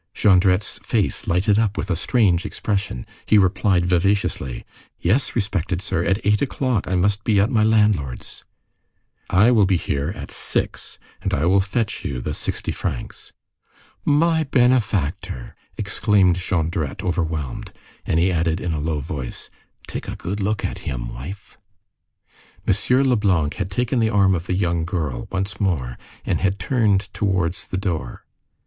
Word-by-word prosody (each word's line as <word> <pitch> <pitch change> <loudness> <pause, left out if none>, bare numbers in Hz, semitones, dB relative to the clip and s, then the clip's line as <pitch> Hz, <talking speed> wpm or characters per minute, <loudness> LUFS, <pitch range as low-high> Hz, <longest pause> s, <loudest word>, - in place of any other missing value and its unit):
Jondrette's 95 0 +3
face - - -1
lighted 100 +5 +2
up 110 -2 0
with 95 - -2
a - - +2
strange 90 -1 +2
expression. 100 - -3 0.2
He 110 - +5
replied 95 -1 +3
vivaciously:— 90 -7 0 0.3
"Yes, 110 +11 +1
respected 95 -5 -1
sir. 95 -2 -1
At 95 +4 0
eight 105 0 +3
o'clock, 130 -5 0
I 95 - 0
must 100 +4 +1
be 105 -3 +3
at 105 +6 +2
my 110 -3 +3
landlord's." 105 - +1 0.9
"I 105 +6 +5
will 105 -5 +4
be 95 -1 +3
here 70 -3 -2
at - - -8
six, - - -3 0.2
and - - 0
I 75 - 0
will 95 +2 +4
fetch 105 +3 -2
you 65 -3 -3
the - - -3
sixty - - -2
francs." - - -5 0.7
"My 160 +2 +3
benefactor!" 110 - 0 0.2
exclaimed 100 -3 +2
Jondrette, 85 -5 -2
overwhelmed. 80 -6 -2 0.3
And 80 - +1
he 90 +2 +3
added, 85 0 0
in 85 - -2
a 75 - -2
low 75 -1 -1
tone: 70 -3 -4 0.6
"Take - - -6
a - - -4
good 100 +4 -4
look 105 +1 -1
at - - -4
him, - - -4
wife!" 95 +11 -9 1.1
M. 125 +7 +3
Leblanc 100 - +2
had 95 -2 -3
taken 120 +5 0
the 110 -1 +2
arm 100 -3 +4
of 85 -1 -3
the 90 - 0
young 85 -3 0
girl, 80 -8 -3
once 95 +1 -3
more, 70 - -1 0.3
and - - 0
had 95 +1 +1
turned 105 -1 +2
towards 95 -3 -1
the 95 - -3
door. 85 -10 -3
95 Hz, 155 wpm, -22 LUFS, 85-105 Hz, 1.1 s, He